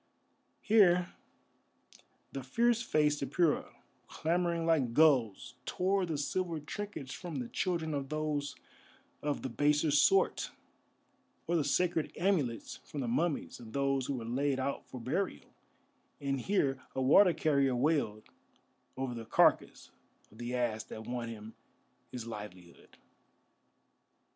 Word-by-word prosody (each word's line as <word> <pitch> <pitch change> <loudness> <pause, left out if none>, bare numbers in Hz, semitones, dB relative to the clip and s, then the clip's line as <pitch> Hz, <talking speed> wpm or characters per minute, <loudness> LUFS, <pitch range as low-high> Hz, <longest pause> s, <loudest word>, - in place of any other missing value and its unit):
Here 180 -5 +4 1.2
the 135 - -5
fierce 235 - +2
faced 150 -9 +1
Apura, 150 +4 +1 0.4
clamouring 170 0 0
like 140 -8 +2
gulls, 125 -6 +3
tore 190 0 +1
the 160 -3 -2
silver 165 +3 -2
trinkets 150 -3 -6
from 175 -4 -7
the 125 -3 -3
children 165 +1 -2
of 140 -2 -3
those 150 -2 -2 0.7
of 145 -1 -2
the 130 - -2
baser 150 +4 +2
sort, 385 - +3 1.0
or 175 - 0
the 160 - +2
sacred 165 +3 +1
amulets 160 - 0
from 145 - -7
the 125 - -2
mummies 150 +6 -1
of 115 -2 -11
those 135 -1 0
who 140 - -1
were 120 -3 -5
laid 135 +3 0
out 140 +1 -3
for 130 - -8
burial, 155 +12 -3 0.7
and 135 -2 -2
here 135 -9 0
a 130 - -1
water 180 +8 +7
carrier 140 -5 +2
wailed 125 -6 0 0.7
over 130 -2 -2
the 115 -1 -6
carcass 110 - +2 0.4
of 110 - -17
the 120 +1 -3
ass 115 -3 -1
that 110 - -8
won 120 -1 -4
him 110 -1 -9 0.6
his 120 -3 -6
livelihood. 105 -6 -10
140 Hz, 130 wpm, -32 LUFS, 125-165 Hz, 1.2 s, water